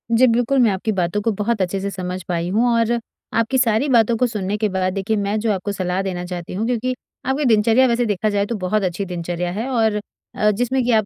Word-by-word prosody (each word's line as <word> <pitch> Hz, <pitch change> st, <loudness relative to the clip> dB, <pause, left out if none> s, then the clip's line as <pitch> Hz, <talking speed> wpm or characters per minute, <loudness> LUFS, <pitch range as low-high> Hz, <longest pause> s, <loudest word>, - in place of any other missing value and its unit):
जी 255 Hz, +3 st, +6 dB
बिल्कुल, 245 Hz, +3 st, +2 dB
मैं 230 Hz, -4 st, +5 dB
आपकी 195 Hz, +4 st, -1 dB
बातों 180 Hz, +4 st, 0 dB
को 225 Hz, -, +1 dB
बहुत 215 Hz, -1 st, 0 dB
अच्छे 185 Hz, +2 st, -1 dB
से 200 Hz, -, -2 dB
समझ 185 Hz, -1 st, -4 dB
पाई 175 Hz, 0 st, -1 dB
हूँ। 225 Hz, +5 st, +2 dB
और 230 Hz, 0 st, +2 dB, 0.5 s
आपकी 230 Hz, +3 st, +1 dB
सारी 245 Hz, +2 st, +2 dB
बातों 235 Hz, -2 st, +4 dB
को 250 Hz, -, +2 dB
सुनने 210 Hz, -3 st, -2 dB
के 215 Hz, -, +1 dB
बाद 185 Hz, -1 st, -1 dB
देखिए 200 Hz, +3 st, -1 dB
मैं 205 Hz, +1 st, -1 dB
जो 220 Hz, 0 st, 0 dB
आपको 195 Hz, +1 st, -3 dB
सलाह 185 Hz, -1 st, -1 dB
देना 180 Hz, -2 st, -3 dB
चाहती 175 Hz, -1 st, -6 dB
हूँ 205 Hz, +4 st, -1 dB
क्योंकि 250 Hz, +1 st, -1 dB, 0.3 s
आपकी 270 Hz, +3 st, 0 dB
दिनचर्या 230 Hz, +3 st, +4 dB
वैसे 240 Hz, 0 st, +1 dB
देखा 215 Hz, 0 st, 0 dB
जाए 205 Hz, -1 st, +1 dB
तो 235 Hz, -, -3 dB
बहुत 200 Hz, +2 st, 0 dB
अच्छी 185 Hz, +2 st, -2 dB
दिनचर्या 175 Hz, -1 st, -3 dB
है 220 Hz, +7 st, -3 dB
और 220 Hz, -4 st, +1 dB, 0.4 s
अ, 210 Hz, 0 st, +3 dB
जिसमें 245 Hz, +4 st, 0 dB
कि 245 Hz, -, +1 dB
आप 220 Hz, -2 st, +3 dB
210 Hz, 240 wpm, -20 LUFS, 185-235 Hz, 0.5 s, जी